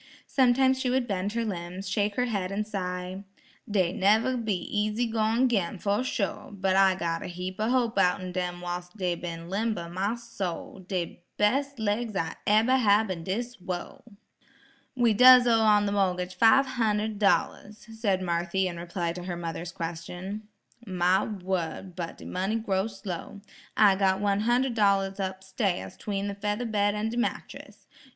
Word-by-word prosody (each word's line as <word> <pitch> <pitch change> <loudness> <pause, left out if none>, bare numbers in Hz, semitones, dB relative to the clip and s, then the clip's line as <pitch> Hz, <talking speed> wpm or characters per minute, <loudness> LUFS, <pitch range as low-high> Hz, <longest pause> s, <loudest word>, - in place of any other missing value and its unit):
Sometimes 260 0 +3
she 260 - 0
would 255 0 +1
bend 200 0 -2
her 230 0 -1
limbs, 180 -1 -5
shake 205 +1 0
her 250 - +1
head 200 -6 -2
and 210 +2 -1
sigh, 185 -2 -4 0.5
"Dey 185 -4 +1
neber 220 +6 +3
be 220 -5 -1
easy 210 +5 -1
goin' 225 +2 +2
'gin, 205 -5 0
fuh 200 +4 0
sho', 220 -6 -2
but 190 -1 +1
I 190 -1 +5
got 165 -2 -2
a - - -5
heap 180 +1 -6
o' 215 +2 +1
hope 245 -2 +1
outen 180 0 +1
dem 180 -1 -3
whilst 175 +2 -6
dey 180 -3 0
ben 170 -1 -6
limber, 200 -2 -2
my 195 +6 -1
soul; 200 -6 -6
de 180 -2 -4 0.2
bes' 275 +7 +1
laigs 220 0 -1
I'll 165 -3 -1
eber 225 +5 +4
hab 210 -3 +3
in 170 -3 -5
dis 235 +7 -3
wurl." 180 -1 -6 0.9
"We 240 -3 +3
does 250 +3 +8
owe 230 -2 +4
on 210 -1 +4
the 200 - 0
mor'gage 185 -2 0
five 225 +8 +5
hundred 220 -4 -1
dollars," 205 0 0
said 200 -4 0
Marthy 175 +2 0
in 175 -1 -5
reply 170 0 -3
to 180 0 -7
her 175 -2 -4
mother's 165 0 -5
question. 175 +5 -6 0.4
"My 185 -1 +2
wurd, 185 -3 -4
but 170 -2 -5
de - - -12
money 190 +4 -2
grow 200 -3 0
slow; 200 -1 -7 0.4
I 205 -3 +6
got 190 -1 +2
one 200 0 +1
hunder' 245 +4 +2
dollars 200 -3 +2
up 190 0 -3
stairs 190 -1 -2
'tween 200 -1 -3
the 200 - -3
feather 210 +4 -2
bed 205 -2 +1
an' 215 +1 -1
de 235 - -5
mattress. 240 - -4
200 Hz, 175 wpm, -27 LUFS, 180-220 Hz, 0.9 s, does